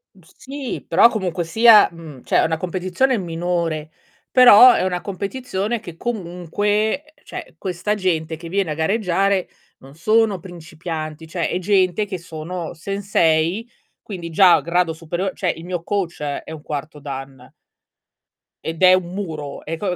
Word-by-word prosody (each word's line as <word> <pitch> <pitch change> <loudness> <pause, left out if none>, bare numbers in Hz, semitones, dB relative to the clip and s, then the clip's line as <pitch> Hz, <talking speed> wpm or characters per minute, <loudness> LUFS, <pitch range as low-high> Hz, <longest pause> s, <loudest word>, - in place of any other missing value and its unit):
Mhmm, - - -20 0.2
sì 275 -2 -6
però 195 +8 +6
comunque 185 -5 -2
sia, 220 +5 +6
mhmm, 160 -6 -12
cioè, - - +2
è - - +2
una 160 0 0
competizione 185 +9 0
minore, 165 -3 -2 0.4
però 250 -1 +9
è - - 0
una 180 -1 -1
competizione 205 +2 -3
che 175 -6 -11
comunque 205 - -1 0.2
uhm, - - -31
cioè, - - -9
questa 190 +3 -2
gente 165 -5 -1
che 165 +1 -9
viene 190 -4 0
a - - 0
gareggiare 195 +2 +1 0.3
non 135 +2 -15
sono 215 +2 +2
principianti, 160 -2 -7
cioè 170 -1 -2
è 180 - -1
gente 190 +1 +2
che 195 -2 -5
sono 170 +1 -6
sensei, 190 +2 0 0.3
quindi 175 -5 -7
già 175 +1 +6
a 155 - 0
grado 170 +2 0
superio 175 +4 -3
cioè, 180 - -2
il 165 - -10
mio 175 -2 -4
coach 180 -6 -3
è 145 +2 -4
un 155 - -8
4º 150 +1 -5
Dan 135 -2 -8 1.1
ed 165 +2 -5
è 185 0 +8
un 180 -1 0
muro. 155 -8 -6
E 165 +1 -4
co 185 -2 -2
180 Hz, 160 wpm, -20 LUFS, 160-200 Hz, 1.1 s, però